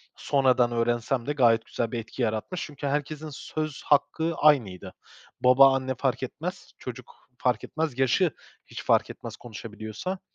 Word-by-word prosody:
sonradan 130 -3 +2
öğrensem 120 +1 0
de 145 - -1
gayet 115 -4 +4
güzel 115 -1 -3
bir 120 - -2
etki 115 +3 -7
yaratmış 110 - -2
çünkü 145 -1 -6
herkesin 150 +2 -2
söz 155 +1 -5
hakkı 160 +3 +2
aynıydı. 125 -12 +2 0.5
Baba, 135 +2 +7
anne 130 -1 -2
fark 130 +1 -1
etmez; 175 +8 -6
çocuk 125 -1 -9 0.2
fark 125 -2 0
etmez, 155 -5 -3
yaşı 140 +6 +3 0.3
hiç - - -8
fark - - +3
etmez, - - -8
konuşabiliyorsa 110 - -6
130 Hz, 145 wpm, -27 LUFS, 120-150 Hz, 0.5 s, Baba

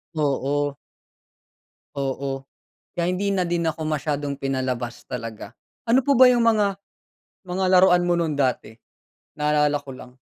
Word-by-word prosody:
oo. 145 -1 0 1.3
Oo 135 0 -3 0.5
kaya 170 0 0
hindi 200 +2 -1
na 185 -2 0
din 170 -1 0
ako 160 0 -6
masyadong 145 -2 -2
pinalabas 130 -3 -3
talaga. 115 -3 -7 0.3
Ano 245 +3 +4
po 280 - +1
ba 260 - +9
yung 240 -1 +3
mga 210 -4 +2 0.7
mga 185 +1 -2
laruan 180 -1 +5
mo 175 - +3
nu'n 160 -3 -1
dati? 130 -5 -1 0.6
Naalala 150 0 +2
ko 140 -1 -11
lang. 130 0 -13
150 Hz, 135 wpm, -23 LUFS, 135-180 Hz, 1.3 s, ba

